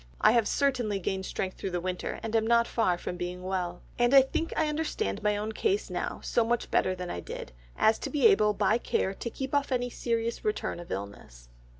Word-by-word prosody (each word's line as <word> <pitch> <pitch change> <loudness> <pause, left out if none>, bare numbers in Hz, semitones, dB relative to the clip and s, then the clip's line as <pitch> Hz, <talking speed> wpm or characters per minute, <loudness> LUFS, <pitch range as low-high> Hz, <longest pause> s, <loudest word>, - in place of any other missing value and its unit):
I 215 - +6
have 230 -2 +3
certainly 250 -7 +1
gained 190 0 -3
strength 185 -1 -4
through - - -3
the 175 -1 -2
winter, 180 +1 -3
and 225 0 -3
am 220 0 +2
not 235 0 +4
far 185 -7 +1
from 180 - -5
being 180 +1 -5
well. 180 -2 -3 0.2
And 240 +3 +4
I 270 - +10
think 325 +5 -2
I 315 - +2
understand 300 - -2
my 210 0 +1
own 215 +1 -3
case 405 - 0
now - - -3
so 235 - +2
much 235 +1 -1
better 185 - +2
than 180 -1 -5
I - - -4
did, 75 - -7 0.3
as 220 0 +4
to - - -4
be 295 - +1
able 215 - +6
by 210 +3 +2
care 190 - 0
to 235 - -5
keep 265 +4 -5
off 285 -1 +1
any 245 -1 0
serious 230 -1 -2
return 425 - -2
of 175 - -10
illness." 95 -12 -7
220 Hz, 225 wpm, -29 LUFS, 180-245 Hz, 0.3 s, I